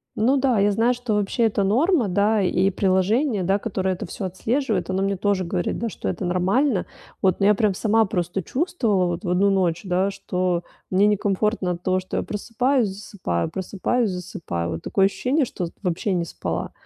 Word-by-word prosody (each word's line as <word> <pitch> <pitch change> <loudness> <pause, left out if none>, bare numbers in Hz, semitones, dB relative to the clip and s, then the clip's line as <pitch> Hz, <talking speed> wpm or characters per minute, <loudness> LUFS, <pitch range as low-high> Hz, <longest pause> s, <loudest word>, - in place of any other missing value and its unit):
Ну 255 +6 +3
да, 255 -5 +2
я 205 +1 +3
знаю, 225 +4 +2
что 245 -2 -3
вообще 210 +4 0
это 210 -3 +2
норма, 255 - +2
да. 205 +3 +2
И 190 0 +2
приложение, 200 +5 +1
да, 195 +3 +1
которое 190 -3 -1
это 180 - -6
всё 195 - -6
отслеживает, 215 +2 -1
оно 190 +1 0
мне 200 0 0
тоже 200 0 +1
говорит, 175 0 -2
да, 230 - -2
что - - -4
это 190 - -3
нормально. 190 +6 +1 0.4
Вот. 185 -2 +2
Но 200 - +2
я 210 - +6
прям 210 -2 +1
сама 220 +3 +2
просто 185 -2 -2
чувствовала 230 - 0
вот 175 +3 -3
в 175 - -3
1 190 +3 +3
ночь, 175 -3 +1
да, 185 +2 +1
что 180 -2 -1 0.3
мне 190 +2 +3
некомфортно 205 -1 +1
от 175 0 -5
того, 185 0 +1
что 185 - -5
я - - 0
просыпаюсь, 240 +3 0
засыпаю, 190 - -3
просыпаюсь, 200 +5 -1
засыпаю. 170 - -4
Вот 80 -1 -4
такое 195 - +2
ощущение, 260 +8 +1
что 185 -6 -4
вот 170 - -8
вообще 185 +2 -1
не 175 -2 0
спала. - - -4
195 Hz, 195 wpm, -23 LUFS, 185-225 Hz, 0.4 s, я